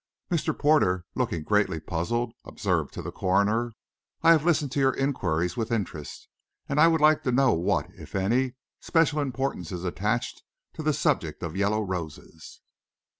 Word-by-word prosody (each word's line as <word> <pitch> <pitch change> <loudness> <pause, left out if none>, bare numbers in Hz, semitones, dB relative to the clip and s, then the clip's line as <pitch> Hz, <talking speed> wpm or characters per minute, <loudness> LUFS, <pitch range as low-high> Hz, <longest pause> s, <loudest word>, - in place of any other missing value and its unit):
Mr. 170 -3 0
Porter, 95 - +3
looking 115 -11 -2
greatly 105 -3 +1
puzzled, 115 +10 -2
observed - - -1
to - - -7
the - - -5
coroner, 105 +5 +1 0.5
"I 165 - +7
have 160 -3 +5
listened 155 -5 +1
to - - -1
your 135 -1 +3
inquiries 90 - -1
with 115 -1 -3
interest; 95 -10 -4 0.4
and 140 - 0
I 165 - +8
would 160 -2 +2
like 155 0 +5
to 125 - -1
know 130 0 +4
what, 85 +2 +1
if - - -11
any, 120 +7 +1 0.2
special 165 -2 +2
importance 135 - -2
is 90 -1 -5
attached 105 +7 -2 0.3
to - - -6
this - - 0
subject - - 0
of 85 0 -4
yellow 105 +2 +1
roses." 85 -4 -7
115 Hz, 165 wpm, -26 LUFS, 90-135 Hz, 0.5 s, I